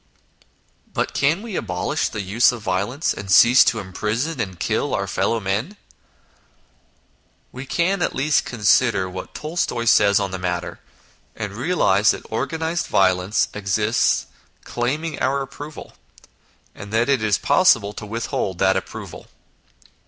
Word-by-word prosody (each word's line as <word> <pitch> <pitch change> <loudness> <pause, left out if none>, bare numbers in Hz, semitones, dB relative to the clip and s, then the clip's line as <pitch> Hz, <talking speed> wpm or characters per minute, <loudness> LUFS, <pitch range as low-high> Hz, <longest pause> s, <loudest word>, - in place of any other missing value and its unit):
But - - -2
can 155 +9 +1
we 225 -5 -6
abolish 90 - -2
the 105 - -5
use 105 +7 +3
of 120 -3 -8
violence, 100 - -1
and 95 - -8
cease 120 +8 +7
to 115 - +1
imprison 110 - -3
and 95 -6 -4
kill - - -1
our - - -1
fellow 115 - 0
men? 110 - -3 1.7
We 130 +2 -8
can 180 +5 0
at - - -1
least 150 +2 +2
consider 110 -3 +2
what 95 0 -8
Tolstoy 150 -7 -2
says 100 -2 +5
on 100 -2 -2
the 95 - -5
matter, 90 -1 -3 0.6
and - - -5
realise - - +2
that - - -1
organised 160 +1 -2
violence 95 +1 +2
exists 105 +2 +1 0.4
claiming 150 +6 -3
our 140 +1 0
approval, 145 +3 -10 0.8
and 100 0 -10
that 115 +2 +1
it 135 -4 +2
is 110 -2 +2
8 - - -1
INTRODUCTION - - -20
possible 115 - +4
to 105 - -8
withhold 105 -4 -3
that 95 +1 +3
approval. 95 - -6
115 Hz, 145 wpm, -21 LUFS, 95-140 Hz, 1.7 s, cease